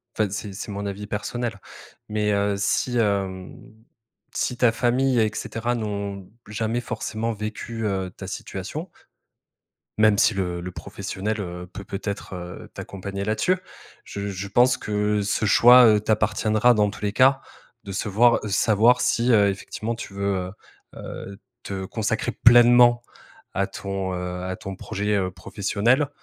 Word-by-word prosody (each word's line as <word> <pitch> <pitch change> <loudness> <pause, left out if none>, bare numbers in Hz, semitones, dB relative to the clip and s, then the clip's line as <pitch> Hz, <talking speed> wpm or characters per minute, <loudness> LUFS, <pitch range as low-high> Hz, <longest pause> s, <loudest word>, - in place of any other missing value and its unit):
enfin, 110 -2 +1
c'est 100 +1 -5
c'est 100 +2 -6
mon 100 +1 -4
avis 100 +1 -5
personnel 115 +1 -3 0.5
mais, 105 0 0
heu, 100 0 +1
si, 120 +5 0
hem, 95 -4 -1 0.8
si 125 - -2
ta 120 -2 +4
famille 125 +2 +2
et 110 -1 +2
cetera 120 +2 -3
n'ont 100 -3 -4 0.2
jamais 110 +3 -2
forcément 115 -1 -3
vécu, 110 +1 -5
heu, 95 -3 -2
ta 95 - -7
situation 100 - -6 1.1
même 110 -1 +5
si 110 - +4
le 90 -2 -2
le 90 +1 -6
professionnel, 105 +4 -4
heu, 90 -2 -6
peut 100 - -8
peut-être, 100 0 -5
heu, 90 0 -8
t'accompagner 100 +1 -6
là-dessus 110 - +1 0.5
je 100 0 -5
je 100 0 -5
pense 125 +5 +4
que 105 -1 -1
ce 105 +2 -1
choix, 125 +5 +8
heu, 105 -2 +5
t'appartiendra 110 +2 +2
dans 105 -2 +3
tous - - -12
les 105 -1 0
cas, 135 +4 +4 0.4
de 100 - -6
se 105 +3 -2
voir, 120 +4 +4
heu, - - -3
savoir 110 +4 +4
si, 120 +2 +1
heu, 105 -3 +5
effectivement 100 +4 -4
tu 115 -3 -8
veux, 100 0 -1 0.6
heu - - -18
heu, 100 0 -8 0.2
te 95 -1 -5
consacrer 110 +4 -2
pleinement 120 0 +6 0.5
à - - +1
ton, 95 -1 -4
heu, 90 0 -4
à 95 0 -3
ton 95 0 -7
projet, 105 +2 -2
heu, 95 -2 0
professionnel 105 - 0
105 Hz, 155 wpm, -24 LUFS, 100-115 Hz, 1.1 s, choix